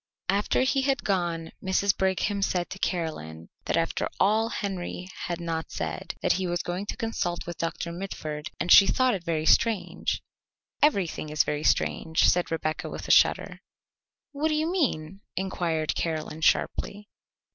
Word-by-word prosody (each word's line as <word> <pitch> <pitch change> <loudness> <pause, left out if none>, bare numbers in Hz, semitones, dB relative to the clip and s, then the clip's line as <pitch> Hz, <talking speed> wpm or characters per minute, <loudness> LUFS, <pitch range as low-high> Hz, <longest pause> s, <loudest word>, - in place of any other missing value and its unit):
After 200 +5 +2
he 270 +1 +2
had 275 +1 0
gone 175 -4 -1
Mrs. 195 +1 +2
Brigham 190 +2 0
said 180 -2 0
to 190 - -7
Caroline 85 - -3 0.2
that - - +1
after - - 0
all 220 +3 +3
Henry 185 -4 -4 0.2
had 175 -1 -3
not 165 -1 -3
said 80 -1 -4
that - - +3
he 185 0 -1
was 175 0 -1
going 180 +3 -4
to - - -4
consult 175 -6 -2
with 170 -1 -7
Doctor 170 +1 -3
Mitford, 155 -4 -5
and 175 - 0
she 195 - +10
thought 255 +3 +3
it 190 -4 -3
very 160 -2 -1
strange. 225 +1 +2 0.6
"Everything 195 - +2
is 150 -2 +3
very 150 0 -2
strange," 160 +1 +2
said 180 0 +3
Rebecca 155 -1 -2
with - - -7
a - - +2
shudder. - - +4 0.7
"What 295 +2 0
do 310 - +1
you 315 +2 0
mean?" 195 - -1
inquired 170 -4 -1
Caroline 160 -1 -3
sharply. 205 +5 +1
180 Hz, 160 wpm, -27 LUFS, 160-200 Hz, 0.7 s, she